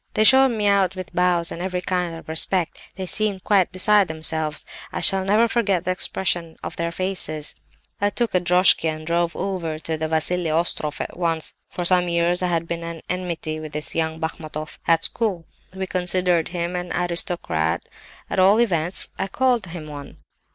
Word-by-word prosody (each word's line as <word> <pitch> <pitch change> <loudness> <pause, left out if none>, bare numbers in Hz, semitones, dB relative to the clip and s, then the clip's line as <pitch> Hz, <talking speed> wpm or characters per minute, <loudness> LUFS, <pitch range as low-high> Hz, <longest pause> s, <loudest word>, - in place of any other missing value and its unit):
"They 215 - +4
showed 265 +4 +8
me 220 -4 -2
out 195 -2 +3
with 185 -1 -7
bows 175 -1 +2
and 170 - -6
every 180 -1 -3
kind 180 -2 -1
of 165 - -11
respect; 165 +2 0
they 190 - -4
seemed 200 +1 -1
quite 195 -4 +3
beside 200 +1 +4
themselves. 160 -1 +1 0.3
I - - -3
shall 195 -1 +5
never 210 +4 +3
forget 200 -7 +1
the 185 - +1
expression 175 -3 -1
of - - -5
their 170 0 -2
faces! 170 -4 -1 0.5
"I 205 - +3
took 235 +2 -1
a 180 - +4
droshky 180 -1 +4
and 155 0 -5
drove 170 +1 0
over 180 -5 -3
to 160 0 -3
the 160 0 -2
Vassili 160 +2 0
Ostroff 155 -2 -1
at - - -6
once. 165 -3 -1 0.2
For 175 - -4
some 180 0 +4
years 170 +1 +1
I 180 - +1
had 170 -1 -1
been 170 0 -4
at 165 -1 -7
enmity 170 -3 -3
with 155 -1 -8
this 150 0 -2
young 160 -1 -1
Bachmatoff, 155 -1 -5
at 165 -1 +4
school. 195 -8 -1 0.3
We 190 0 -3
considered 180 -2 0
him 175 0 -3
an 180 0 -4
aristocrat; 170 - 0 0.4
at - - -2
all 195 +4 +5
events 180 -6 0
I 190 - -1
called 245 -1 +1
him 170 -2 -7
one. 145 -2 -9
175 Hz, 185 wpm, -22 LUFS, 160-190 Hz, 0.5 s, showed